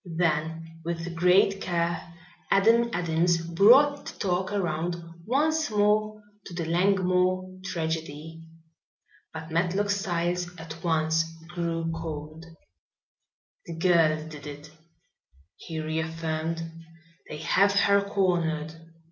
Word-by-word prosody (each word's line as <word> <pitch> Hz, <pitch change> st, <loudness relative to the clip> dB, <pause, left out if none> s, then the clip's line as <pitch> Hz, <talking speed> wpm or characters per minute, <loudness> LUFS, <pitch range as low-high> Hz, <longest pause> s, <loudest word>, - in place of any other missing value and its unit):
Then 165 Hz, 0 st, -1 dB
with 170 Hz, +1 st, -4 dB
great 180 Hz, +3 st, +3 dB
care 170 Hz, -1 st, -2 dB, 0.4 s
Adam 230 Hz, +4 st, +4 dB
Adams 170 Hz, -1 st, +1 dB
brought 240 Hz, -, +4 dB
the -, -, -6 dB
talk 185 Hz, 0 st, -1 dB
around 175 Hz, -3 st, -1 dB, 0.3 s
once 310 Hz, +5 st, +1 dB
more 215 Hz, 0 st, +1 dB, 0.2 s
to 180 Hz, -, -10 dB
the 170 Hz, -1 st, -2 dB
Langmore 185 Hz, +1 st, +1 dB
tragedy. 160 Hz, -3 st, -4 dB, 0.9 s
But 160 Hz, 0 st, -8 dB
Matlock 185 Hz, +5 st, +1 dB
Styles 175 Hz, -3 st, -1 dB
at 165 Hz, 0 st, -9 dB
once 160 Hz, -1 st, +2 dB, 0.3 s
grew 165 Hz, -1 st, -2 dB
cold. 160 Hz, 0 st, -6 dB, 1.2 s
"The 170 Hz, -, -6 dB
girl 165 Hz, -3 st, +2 dB
did 150 Hz, -2 st, -9 dB
it," 145 Hz, +1 st, -9 dB, 0.8 s
he 165 Hz, -2 st, -7 dB
reaffirmed. 160 Hz, +1 st, -3 dB, 0.7 s
"They 150 Hz, -, -6 dB
have 200 Hz, +6 st, +3 dB
her 200 Hz, 0 st, +4 dB
cornered. 170 Hz, -6 st, 0 dB
170 Hz, 105 wpm, -27 LUFS, 160-190 Hz, 1.2 s, Adam